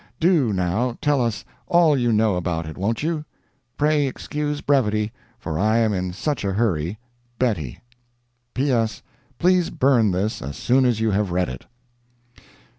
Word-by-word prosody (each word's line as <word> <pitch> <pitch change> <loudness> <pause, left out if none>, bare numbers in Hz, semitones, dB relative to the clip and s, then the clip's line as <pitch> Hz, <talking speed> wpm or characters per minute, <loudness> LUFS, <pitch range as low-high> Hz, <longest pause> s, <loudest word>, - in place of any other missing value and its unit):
Do, 160 - +3
now, 100 +6 -1
tell 145 -3 +2
us 115 -3 -2 0.2
all 170 -3 +4
you 120 -3 +1
know 110 -2 +2
about 85 -2 -2
it, 80 -1 -7
won't 110 +7 -2
you? 160 -1 -1 0.5
Pray 150 -1 +2
excuse 145 +2 -3
brevity, 110 -7 +1 0.3
for 80 -9 -4
I 110 +3 +3
am 110 -2 +2
in 90 -1 -2
such 140 - -2
a 100 -1 -1
hurry. 95 -4 0 0.4
BETTIE. 90 - -1 0.7
"P. 135 +3 +1
S.—Please 130 - 0
burn 125 -5 +3
this 95 +4 -1
as 70 +2 -6
soon 130 +1 +3
as 120 -3 +1
you 110 -1 +2
have 100 0 0
read 90 +1 0
it." 65 -1 -9
115 Hz, 155 wpm, -22 LUFS, 95-140 Hz, 0.7 s, all